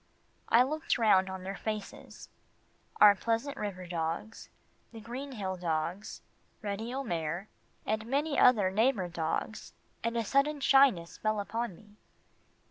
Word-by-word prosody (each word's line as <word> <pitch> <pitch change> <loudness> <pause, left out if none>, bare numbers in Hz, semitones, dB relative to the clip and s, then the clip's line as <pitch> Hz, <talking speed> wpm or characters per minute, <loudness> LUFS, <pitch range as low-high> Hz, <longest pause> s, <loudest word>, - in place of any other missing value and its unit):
I 235 +2 +6
looked 310 +4 -1
round 195 -5 +4
on 190 -1 -6
their 195 +1 -5
faces 215 0 -6 0.7
our 210 -1 +9
Pleasant 230 +7 -2
River 190 -3 -5
dogs, 170 +5 -4 0.4
the 225 - -10
Green 255 +5 -7
Hill 190 -5 -4
dogs, 170 +3 -3 0.4
Reddy 210 +3 -3
O'Mare 175 - -3 0.4
and 220 +1 -2
many 285 +3 0
other 210 -7 +5
neighbour 215 -3 +1
dogs, 170 +5 -3 0.3
and 230 +1 -1
a 230 - 0
sudden 285 +5 +2
shyness 270 -12 +4
fell 215 -1 0
upon 215 0 -3
me. 210 +2 -20
215 Hz, 130 wpm, -30 LUFS, 185-240 Hz, 0.7 s, our